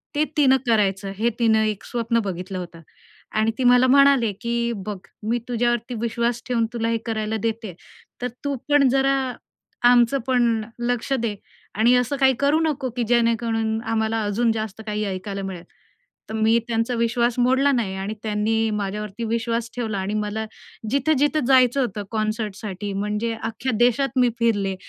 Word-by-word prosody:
ते 300 +1 +2
तिनं 265 -3 +5
करायचं 200 -3 +1
हे 230 +2 +3
तिनं 220 -2 +3
एक 210 -2 -3
स्वप्न 230 -1 0
बघितलं 185 0 -4
होतं 170 -2 -9 0.6
आणि 220 +1 +2
ती 260 - -1
मला 250 +1 +5
म्हणाले 275 -4 +5
की, 235 0 -1
"बघ 200 0 -5 0.3
मी 240 +1 +1
तुझ्यावरती 240 0 0
विश्वास 235 +1 -1
ठेवून 235 -2 +1
तुला 230 -1 -1
हे 230 - +1
करायला 220 -1 -2
देतेय. 225 -3 -3 0.5
तर 250 - 0 0.2
तू 285 -1 -1
पण 290 -2 +5
जरा 270 +1 +2 0.7
आमचं 245 +2 +4
पण 240 -4 +2 0.2
लक्ष 245 +2 -2
दे 220 -3 -1 0.4
आणि 230 +3 +5
असं 250 +3 +1
काही 265 -1 +4
करू 285 +3 +3
नको 295 -5 -1
की 245 - +1
जेणेकरून 230 -1 +1
आम्हाला 220 0 0
अजून 220 +3 +1
जास्त 220 -1 -4
काही 210 0 -2
ऐकायला 195 +1 -4
मिळेल." 185 -3 -6 0.7
तर - - -6
मी 220 +1 +3
त्यांचा 230 +1 0
विश्वास 235 +1 +1
मोडला 260 +3 +3
नाही 225 -8 -1
आणि 195 +2 -4
त्यांनी 220 +1 0
माझ्यावरती 210 +1 -4
विश्वास 230 +1 -1
ठेवला 225 -4 -2
आणि 190 +2 -3
मला 215 +1 -3 0.5
जिथं-जिथं 290 +1 +2
जायचं 260 0 +5
होतं 210 -5 -2
कॉन्सर्टसाठी 215 -2 -3
म्हणजे 210 +3 -2
अख्ख्या 240 +3 -2
देशात 245 +2 +2
मी 250 -1 +4
फिरले 205 -5 +1
230 Hz, 160 wpm, -23 LUFS, 215-245 Hz, 0.7 s, तिनं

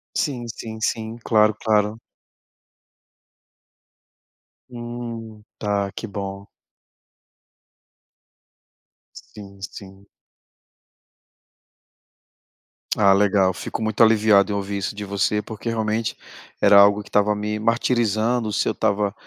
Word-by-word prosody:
Sim, 125 -5 -1
sim, 110 -1 -7
sim, 115 0 -2
claro, 110 -1 +4
claro. 105 0 +1 2.7
Hum, 120 -3 -7
tá, 100 -1 -1
que - - -6
bom. 100 -1 -6 2.7
Sim, 100 - -13
sim. 100 -1 -10 2.9
Ah, 100 -2 +4
legal. 95 -1 +3
Fico 105 - -6
muito 110 0 -1
aliviado 110 -2 +5
em 100 - -1
ouvir 100 0 -3
isso 100 +1 -3
de 105 - -6
você, 100 +1 0
porque 110 +2 -9
realmente 110 0 -1 0.4
era 100 0 +7
algo 100 +1 +5
que - - -16
estava 105 0 +2
me 105 +1 -3
martirizando, 115 0 +1
se - - 0
eu - - +2
estava, 100 -1 0
105 Hz, 100 wpm, -22 LUFS, 100-115 Hz, 2.9 s, era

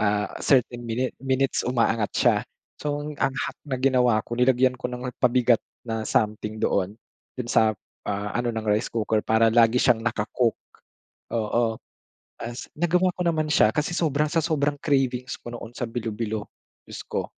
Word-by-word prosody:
ah, 105 -1 +1
certain 125 -3 +2
minute 125 +3 -1
minutes, 135 0 0
umaangat 115 -3 +1
siya. - - +4 0.4
So, 145 0 -2
ang 150 0 -6 0.2
hack - - -3
na 130 -3 -2
ginawa 125 -4 +3
ko, 120 - -6
nilagyan 125 +1 +3
ko - - -24
ng 125 +1 -5
ha - - -2
pabigat 125 -2 +3 0.2
na 115 -1 -3
something 105 0 -1
doon, 95 0 +1 0.4
dun 125 -2 -4
sa, 110 -2 +4 0.3
ah, 100 0 -2
ano 120 0 0
ng 110 -1 -4
rice 105 +3 +2
cooker, 110 -1 0
para 110 +1 +4
lagi 115 +1 +4
siyang 120 -3 +4
naka-cook. 115 +1 +1 0.8
Oo, 115 0 0 0.7
as 120 +1 -6
nagawa 180 +3 +2
ko - - -5
naman 155 -2 +1
siya, 110 -6 +5
kasi 150 +3 0
sobrang 150 -3 +1
sa 165 - +2
sobrang 145 -3 0
cravings 130 -3 0
ko 120 - -9
noon 115 -1 -7
sa - - -4
bilo-bilo, 110 -2 -3 0.4
diyos - - -8
ko. - - -2
120 Hz, 165 wpm, -25 LUFS, 110-130 Hz, 0.8 s, siya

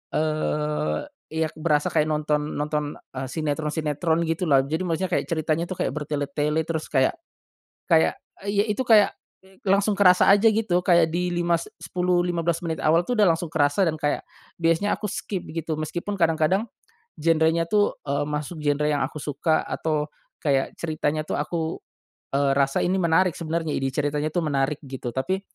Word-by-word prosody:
eee, 150 0 0 0.3
iya 160 0 -1
berasa 150 -2 +1
kayak 155 -1 +2
nonton 150 -1 -1
nonton, 150 0 -2 0.2
eee, 130 0 -4
sinetron-sinetron 155 +2 -1
gitulah. 160 -4 +2
Jadi 155 +5 -2
maksudnya 180 +2 -1
kayak - - +1
ceritanya 160 0 0
tuh 185 - -5
kayak - - -1
bertele-tele 150 +1 -1
terus 160 -1 -3
kayak 130 -2 +2 0.8
kayak 80 0 +5 0.3
iy 200 0 +2
itu 255 +5 -2
kayak 215 -4 +6 0.5
langsung 200 +2 +3
kerasa 185 -2 +5
aja 205 +3 +6
gitu 210 -5 +1
kayak 170 -2 +4
di 180 +1 0
5, 175 0 0
s 170 - -8
sepuluh, 180 +1 0
15 170 -1 -1
menit 160 -1 -3
awal 165 +3 +3
tuh 250 - -1
udah 205 -4 +5
langsung 165 +1 0
kerasa 150 +4 +2
dan 165 - +1
kayak 145 -1 -1 0.3
biasanya 165 +4 +1
aku - - -5
skip 205 -2 -4
gitu. 160 -1 -3
Meskipun 170 +6 -4
kadang-kadang 165 +4 +2 0.5
genrenya 165 +1 +2
tuh, 205 +1 +2
eee, 140 0 0
masuk 150 +2 -4
genre 145 0 +1
yang 145 -2 +1
aku - - -8
suka 155 +2 +1
atau 150 -2 -2 0.3
kayak 135 -3 +1
ceritanya 155 -2 -1
tuh - - -2
aku, 160 +2 -2 0.6
eee, 140 -1 +2
rasa 140 -1 +2
ini 185 +2 +1
menarik 175 +1 +3
sebenarnya 165 -1 -2
ide 135 - 0
ceritanya 145 +2 -1
tuh 170 +2 -1
menarik 140 0 0
gitu. 130 -2 -6
Tapi 185 +10 -1
160 Hz, 165 wpm, -24 LUFS, 150-175 Hz, 0.8 s, kayak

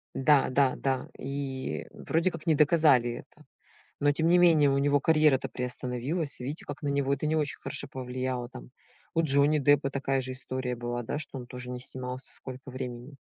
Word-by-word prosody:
Да, 140 0 +4
да, 130 0 +3
да. 130 -1 -1
И, 135 -1 -4
э, - - -18
вроде 165 +3 0
как 165 0 -9
не 160 - +4
доказали 150 -5 +4
это. - - -22 0.6
Но 145 0 +4
тем 160 +3 +1
не 175 +1 +5
менее 160 -5 +5
у 135 - +2
него 145 0 +3
карьера-то 155 -3 +3
приостановилась. 125 +5 -3
Видите 140 +6 -5
как, - - -7
на 145 - -1
него 140 -1 +1
это 140 +2 -1
не 155 +1 +1
очень 150 -2 -1
хорошо - - -4
повлияло, 130 -1 -3
там. - - -11 0.4
У 165 - +3
Джонни 145 0 +3
Деппа 145 -1 +3
такая 135 0 0
же 130 0 -4
история 130 -1 -3
была, 120 0 -3
да, 120 - -3
что 145 -2 -8
он 125 - -8
тоже 125 0 -8
не 125 0 -5
снимался 125 0 -6
сколько 130 +1 -8
времени. 125 +1 -7
135 Hz, 195 wpm, -28 LUFS, 125-145 Hz, 0.6 s, не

